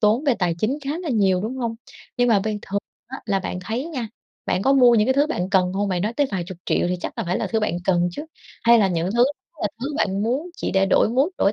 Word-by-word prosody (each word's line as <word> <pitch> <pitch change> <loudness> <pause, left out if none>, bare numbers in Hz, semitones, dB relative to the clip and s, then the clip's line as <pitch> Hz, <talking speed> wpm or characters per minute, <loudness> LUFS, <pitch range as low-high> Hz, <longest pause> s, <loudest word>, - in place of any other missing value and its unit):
tốn 225 +6 +3
về 270 -4 +3
tài 175 -3 +1
chính 250 - 0
khá 275 - -2
là 355 -2 -5
nhiều, 195 -5 +2
đúng 240 +5 -4
hông? 235 -3 -2 0.4
Nhưng 245 0 +3
mà 210 -4 +4
ban 215 -1 -2
thường 200 +1 -2 0.3
á 265 +2 -7
là 195 -3 0
bạn 180 - -4
thấy 230 +6 -2
nha, 260 -9 -4 0.4
bạn 185 - 0
có 270 - +3
mua 250 -3 +6
những 215 -1 +3
cái 260 - +2
thứ 285 +1 +3
bạn 190 - -3
cần 185 -2 +2
hông? 200 +1 -1
Bạn 180 -1 -1
nói 215 - -1
tới 285 +4 +1
vài 185 -3 -1
chục 185 -3 -9
triệu - - +1
thì 180 - 0
chắc - - -6
là - - -1
phải 180 +2 -1
là - - -1
thứ 220 -1 -1
bạn 210 -5 -1
cần 175 -2 +2
chứ? 295 - -6 0.4
Hay 235 0 +6
là 195 -3 +3
những 175 +1 -1
thứ 240 +1 +5 0.4
là 210 - 0
thứ 280 +4 -3
bạn 195 -8 0
muốn 265 +10 -1
chỉ - - -3
để 195 0 +3
đổi 195 - +3
mood, 265 +8 +2
đổi 200 - +3
215 Hz, 285 wpm, -22 LUFS, 190-255 Hz, 0.4 s, mua